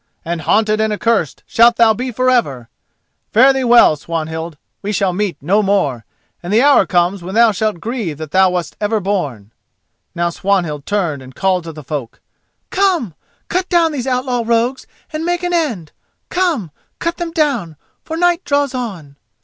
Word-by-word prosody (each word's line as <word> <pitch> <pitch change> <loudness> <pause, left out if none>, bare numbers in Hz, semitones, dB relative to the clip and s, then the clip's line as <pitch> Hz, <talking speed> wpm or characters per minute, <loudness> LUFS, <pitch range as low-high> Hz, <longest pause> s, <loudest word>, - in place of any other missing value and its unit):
—and 170 0 -3
haunted 215 +6 +2
and 220 0 +1
accursed 210 - 0
shalt 235 +1 +4
thou 230 -2 +5
be 250 +3 -4
for 255 +2 -1
ever! 140 - +1 0.6
Fare 260 +5 +6
thee 265 -1 -1
well, 240 -9 +6
Swanhild; 160 +1 -5 0.2
we 205 - -3
shall 195 -3 0
meet 190 -4 -2
no 200 +7 +3
more, 185 - 0 0.4
and 175 - -6
the 215 - +4
hour 285 0 +5
comes 180 +2 +1
when 185 +4 -6
thou 230 -1 +5
shalt 215 -2 -2
grieve 215 - -4
that 155 -1 -7
thou 190 0 +4
wast 180 -3 -3
ever 210 +1 +1
born!" 145 - -3 0.6
Now 170 0 0
Swanhild 170 -6 -1
turned 175 -9 -1
and 130 0 -13
called 185 -3 0
to 165 - -6
the 155 -1 -11
folk: 135 -5 -5 0.5
"Come, 365 - +1 0.3
cut 365 +1 -1
down 335 -2 +3
these 270 -4 -4
outlaw 250 -1 0
rogues 235 +3 0 0.3
and 310 +1 -3
make 350 +1 -1
an 355 0 -1
end. 235 - -1 0.4
Come, 330 - 0 0.3
cut 335 0 -2
them 345 -1 -3
down, 275 - -1 0.3
for 320 - -5
night 350 +1 +2
draws 285 -1 0
on." 185 - -6
210 Hz, 175 wpm, -17 LUFS, 170-255 Hz, 0.6 s, Fare